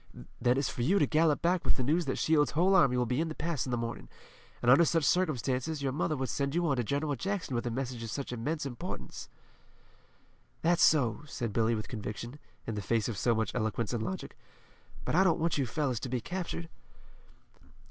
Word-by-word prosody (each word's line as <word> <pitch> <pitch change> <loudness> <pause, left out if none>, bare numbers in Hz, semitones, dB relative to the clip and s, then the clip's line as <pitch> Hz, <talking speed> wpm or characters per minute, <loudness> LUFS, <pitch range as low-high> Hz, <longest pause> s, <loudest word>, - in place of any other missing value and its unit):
Then 125 +1 +3
it's 140 - +1
for - - -4
you 170 +12 +3
to - - +4
gallop 155 -1 +2
back 175 +1 +2
with - - +1
the 130 - -1
news 160 +6 +1
that 135 - -2
Shields' 155 -2 +2
whole 180 +5 +3
army 135 -9 +5
will 125 - +2
be 125 +5 0
in 165 - 0
the 155 - -5
pass 160 -4 -2
in - - -3
the 120 - +1
morning, 115 0 -5 0.5
and 120 - +4
under 140 +6 +7
such 165 0 +2
circumstances, 145 -3 0
your 135 - 0
mother 155 +2 -1
would 130 -1 -2
send 140 +1 -1
you 175 0 +2
on 140 -3 +1
to 120 - +1
General 145 +5 -1
Jackson 190 +2 -3
with 120 0 -1
a - - 0
message 125 0 -4
of 115 - -5
such 135 +2 -4
immense 145 +6 -2
importance." 120 - -6 1.3
"That's 170 +1 +3
so," 125 -8 +4
said 115 -6 -4
Billy 115 +1 +2
with 110 - -4
conviction, 120 +4 -6 0.3
in 115 - -3
the 105 - -3
face 110 +3 0
of 115 - -3
so 115 +4 +1
much 110 0 -1
eloquence 115 -1 -1
and 115 - -1
logic, 95 -4 -5 0.7
"but - - -1
I 185 +4 +5
don't 170 -3 +3
want 165 -2 0
you 135 - +1
fellows 130 -2 -1
to 130 - -5
be 125 0 -1
captured." 170 +4 -4
135 Hz, 220 wpm, -30 LUFS, 120-160 Hz, 1.3 s, under